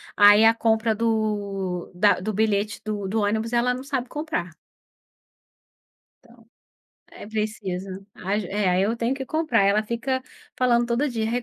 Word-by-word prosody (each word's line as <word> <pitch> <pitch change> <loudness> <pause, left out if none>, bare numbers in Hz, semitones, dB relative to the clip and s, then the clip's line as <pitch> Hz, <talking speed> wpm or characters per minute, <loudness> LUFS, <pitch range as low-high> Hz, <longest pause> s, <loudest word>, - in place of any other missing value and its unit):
aí 205 +1 +7
a 225 0 +7
compra 225 0 +1
do 205 -5 -2
da 205 +2 +3
do 215 +4 -3
bilhete 210 0 0
do 205 -2 -3
do 215 +3 0
ônibus, 220 +3 -1
ela 240 +1 +2
não 255 - -6
sabe 265 -3 -3
comprar. 300 - -3 1.7
Então, 235 -2 -21 0.6
é - - -11
preciso. 195 -3 -4
As 200 +3 -2
é, 200 +1 -1
aí 180 +1 +2
eu 220 +4 0
tenho 235 +3 0
que 270 0 -5
comprar. 310 -10 +1
Ela 200 +2 +3
fica 245 +4 -2 0.3
falando 240 -2 +2
todo 245 +5 0
dia: 225 -3 -2
"Rê, 245 +1 -1
220 Hz, 160 wpm, -24 LUFS, 205-235 Hz, 1.7 s, aí